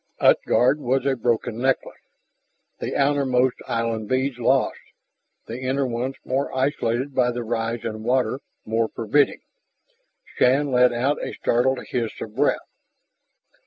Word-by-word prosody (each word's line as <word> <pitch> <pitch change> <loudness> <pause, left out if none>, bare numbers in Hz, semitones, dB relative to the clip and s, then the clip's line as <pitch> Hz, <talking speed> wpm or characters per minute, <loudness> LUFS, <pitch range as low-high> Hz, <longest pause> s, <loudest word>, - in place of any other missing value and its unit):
Utgard 130 +5 +4
was 130 0 0
a 135 -1 +2
broken 115 -1 -1
necklace, 135 +1 -1 0.8
the - - -4
outermost 135 -3 +2
island 115 -2 -2
beads 130 0 0
lost, 130 +2 +2 0.7
the 115 +2 -6
inner 135 +2 0
ones 125 +2 -3
more 135 +2 -1
isolated 130 -1 0
by 125 -1 +2
the 120 0 -3
rise 115 0 -2
in 110 -1 -4
water, 125 +3 +1 0.3
more 115 +1 +1
forbidding. 130 +6 +2 0.8
Shann 135 +3 +2
let 125 0 +5
out 130 +5 0
a - - -4
startled 130 +2 +1
hiss 115 -3 -2
of 110 -1 -7
breath. 145 +3 +2
125 Hz, 130 wpm, -23 LUFS, 115-135 Hz, 0.8 s, let